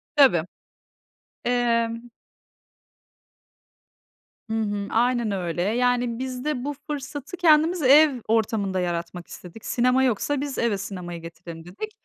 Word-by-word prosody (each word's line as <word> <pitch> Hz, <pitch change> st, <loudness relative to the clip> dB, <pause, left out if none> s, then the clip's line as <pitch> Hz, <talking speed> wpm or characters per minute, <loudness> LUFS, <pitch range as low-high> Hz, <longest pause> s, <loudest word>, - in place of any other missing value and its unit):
Tabii. 260 Hz, -, +5 dB, 1.0 s
Emm 235 Hz, -1 st, 0 dB, 2.4 s
Hı -, -, -2 dB
hı. 205 Hz, -1 st, -2 dB
Aynen 240 Hz, -1 st, +1 dB
öyle. 175 Hz, -3 st, -2 dB
Yani, 245 Hz, +3 st, +1 dB
biz 255 Hz, +1 st, -5 dB
de 280 Hz, -5 st, -1 dB
bu 290 Hz, -, -2 dB
fırsatı 290 Hz, +3 st, -6 dB
kendimiz 330 Hz, 0 st, +4 dB
ev 275 Hz, -1 st, +6 dB
ortamında 215 Hz, -4 st, +1 dB
yaratmak 175 Hz, 0 st, -3 dB
istedik. 180 Hz, +5 st, -11 dB
Sinema 250 Hz, +2 st, +2 dB
yoksa 265 Hz, +4 st, 0 dB
biz 285 Hz, -2 st, -4 dB
eve 230 Hz, -4 st, +1 dB
sinemayı 180 Hz, -3 st, -6 dB
getirelim 165 Hz, 0 st, -10 dB
dedik. 310 Hz, -, -7 dB
235 Hz, 115 wpm, -24 LUFS, 195-265 Hz, 2.4 s, ev